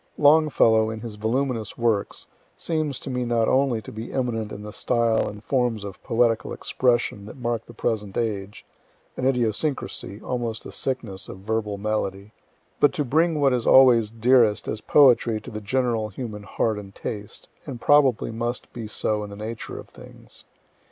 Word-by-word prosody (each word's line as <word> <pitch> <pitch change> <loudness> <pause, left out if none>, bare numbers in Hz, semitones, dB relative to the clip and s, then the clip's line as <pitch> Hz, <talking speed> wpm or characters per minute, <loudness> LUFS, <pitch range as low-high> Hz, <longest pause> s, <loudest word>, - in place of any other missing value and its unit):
Longfellow 145 -7 +4
in 110 0 -6
his 115 -2 -6
voluminous 115 0 -2
works 115 -4 0 0.3
seems 155 -4 -2
to 135 - -5
me 125 0 -1
not 115 -2 +1
only 130 -5 +2
to - - -9
be 110 +2 -7
eminent 115 -5 -2
in 105 - -7
the 105 0 -8
style 115 -2 +1
and 105 +1 -10
forms 120 -5 0
of 100 -2 -8
poetical 115 -1 +1
expression 120 -5 0
that 110 - -10
mark 120 -2 -3
the 120 - -12
present 105 -4 -2
age, 105 -3 -3 0.5
(an 130 - 0
idiosyncrasy, 125 -3 -1
almost 115 -2 -4
a - - -7
sickness, 115 -8 -4
of - - -8
verbal 105 0 -2
melody,) 100 -1 -3 0.5
but 145 - +4
to 150 - -1
bring 160 +4 +2
what 140 -2 +3
is 120 -2 -1
always 120 -5 +6
dearest 115 -1 +3
as 110 - -3
poetry 120 -6 +4
to - - -10
the 110 0 -6
general 115 0 0
human 105 0 -6
heart 105 +1 -1
and 100 -1 -11
taste, 105 -2 -7 0.2
and 125 -3 -6
probably 140 -4 +3
must 120 +2 -4
be 115 -3 -6
so 105 0 -1
in 105 - -7
the 100 - -9
nature 110 +2 -6
of - - -11
things. - - -13
115 Hz, 170 wpm, -24 LUFS, 105-125 Hz, 0.5 s, always